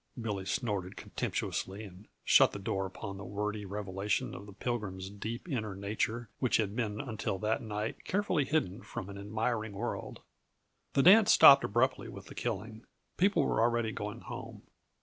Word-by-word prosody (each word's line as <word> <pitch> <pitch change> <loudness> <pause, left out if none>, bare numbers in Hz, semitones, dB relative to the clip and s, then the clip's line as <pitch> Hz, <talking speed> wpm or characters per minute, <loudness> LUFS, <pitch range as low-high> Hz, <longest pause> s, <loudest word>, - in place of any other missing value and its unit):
Billy 105 -4 -3
snorted 100 -6 -2
contemptuously 100 +3 -3
and 100 0 -12 0.2
shut - - +6
the - - -4
door 95 -1 -2
upon 100 +1 -7
the - - -7
wordy 105 +2 -3
revelation 100 0 -2
of 100 - -9
the - - -10
Pilgrim's 100 -4 -4
deep 110 - -6
inner 110 - -2
nature 110 +4 -2
which 125 - +3
had 105 -2 -1
been 110 -3 -2
until 110 -7 -3
that 110 +2 0
night 105 0 -4
carefully 190 -6 +1
hidden 130 - 0
from 95 - -7
an 100 - -8
admiring 110 +1 -2
world. 115 +5 -4 0.7
The 135 - +4
dance 205 +4 +8
stopped 140 0 +9
abruptly 130 +6 +1
with - - -9
the - - -11
killing; 110 +1 -4 0.3
people 195 +3 +3
were - - +1
already 120 -1 +2
going 105 +2 -5
home. - - -8
105 Hz, 165 wpm, -32 LUFS, 100-120 Hz, 0.7 s, stopped